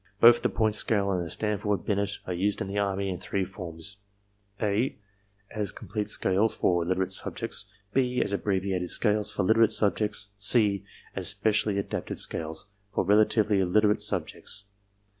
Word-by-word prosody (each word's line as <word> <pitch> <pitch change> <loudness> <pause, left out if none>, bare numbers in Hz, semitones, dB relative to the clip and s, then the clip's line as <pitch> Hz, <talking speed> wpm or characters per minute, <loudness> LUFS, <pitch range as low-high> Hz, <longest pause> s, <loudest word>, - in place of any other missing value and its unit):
Both 120 +1 +7
the - - +1
Point 110 -2 +1
Scale 100 -2 +1
and 90 -2 0
the 85 - -6
Stanford 105 0 -1
Binet 100 -1 -1
are 90 - -3
used 100 +3 0
in - - -3
the 100 +1 -2
Army 100 -1 -1
in 90 -2 -3
three 95 0 -2
forms: 90 0 -4 0.6
(a) 110 +4 0 0.5
as 105 -3 -2
complete 105 -2 -5
scales, 100 +2 +1
for 85 -1 +1
literate 95 +2 -1
subjects, 95 - -2 0.3
(b) 125 -1 +1
as - - 0
abbreviated 95 -3 -1
scales, 105 -2 +2
for - - -1
literate 110 +3 +4
subjects, 105 0 +1
(c) 100 -1 +3 0.3
as - - -1
specially 100 +1 +1
adapted 100 - -3
scales, 80 +5 -1 0.2
for 100 - 0
relatively 105 +1 +3
illiterate 105 +3 +2
subjects. 105 - -2
100 Hz, 155 wpm, -27 LUFS, 95-105 Hz, 0.6 s, Both